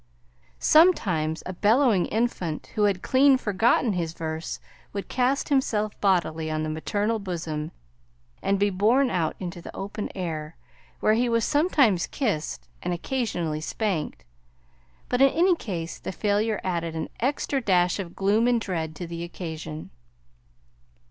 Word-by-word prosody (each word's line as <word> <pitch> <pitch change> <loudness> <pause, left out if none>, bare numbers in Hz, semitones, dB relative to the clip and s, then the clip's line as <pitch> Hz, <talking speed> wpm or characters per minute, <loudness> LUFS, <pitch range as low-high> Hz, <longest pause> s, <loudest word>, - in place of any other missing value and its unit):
Sometimes 180 - +3
a 185 - -4
bellowing 215 +1 +3
infant 205 -8 -2
who 210 - +2
had 195 -3 0
clean 270 +1 +5
forgotten 225 +1 +2
his 170 -3 -2
verse 160 0 -4 0.3
would 200 -1 -4
cast 260 +2 +1
himself 215 -7 +1
bodily 165 -5 +1
on 155 0 -1
the 155 - -2
maternal 205 +8 -1
bosom 160 -5 -4 0.7
and 200 - +1
be 200 +1 +2
borne 230 +8 +3
out 170 -4 0
into 175 -2 -6
the - - -9
open 200 +2 -4
air, 160 -4 -4 0.4
where 215 - +4
he 240 +2 +2
was 230 -1 +2
sometimes 280 - +3
kissed 205 - -2
and 175 0 -1
occasionally 175 - -2
spanked; 155 - -2 0.8
but 250 +1 0
in 275 - +8
any 345 +6 +3
case 170 - -5
the - - -5
failure 210 +2 0
added 170 -3 -2
an 160 - -3
extra 270 +2 0
dash 180 -4 +2
of 175 -3 -6
gloom 210 +4 +2
and 245 -1 +3
dread 165 -7 -3
to 175 - -5
the 170 0 -6
occasion. 160 -3 -7
195 Hz, 145 wpm, -26 LUFS, 165-230 Hz, 0.8 s, in